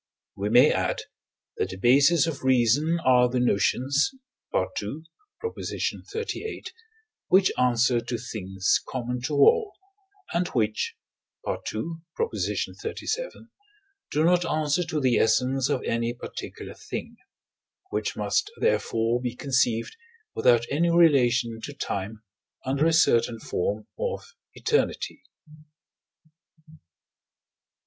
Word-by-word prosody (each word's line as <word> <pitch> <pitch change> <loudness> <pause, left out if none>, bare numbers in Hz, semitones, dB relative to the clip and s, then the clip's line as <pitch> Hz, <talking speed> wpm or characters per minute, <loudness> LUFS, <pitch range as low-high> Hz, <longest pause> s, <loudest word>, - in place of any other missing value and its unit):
We 100 +1 -2
may 125 +6 +6
add - - -1 0.6
that - - -1
the 95 - -7
bases 140 - +5
of 160 -4 -4
reason 130 +6 +3
are 125 -1 +5
the 125 0 0
notions 130 - +2 0.4
(II. 105 +10 -2 0.6
xxxviii.), 440 -1 -4 0.6
which 190 +1 +4
answer 125 -1 +2
to 120 +1 -4
things 95 -5 -1
common 125 -1 -3
to 145 +4 -2
all, 400 - +4 0.6
and 175 +1 +1
which 110 -6 -1 0.5
(II. - - 0 0.6
xxxvii.) 460 +1 -2 0.8
do 150 - +1
not 175 +1 +4
answer 155 0 0
to 155 - -2
the 130 -4 +2
essence 125 +5 +2
of 140 -3 0
any 115 +1 -1
particular - - -8
thing: - - -7 0.7
which - - -2
must 415 - 0
therefore 120 - +1
be 125 -1 -3
conceived 125 -4 0 0.4
without 120 -1 +3
any 165 +5 +2
relation 125 -9 +3
to 145 - -6
time, 105 -3 -4 0.4
under 140 +4 +2
a - - +3
certain 120 -7 +3
form 105 +1 -2
of 480 -1 -4 0.2
eternity. 450 - -1
130 Hz, 110 wpm, -26 LUFS, 115-160 Hz, 0.8 s, may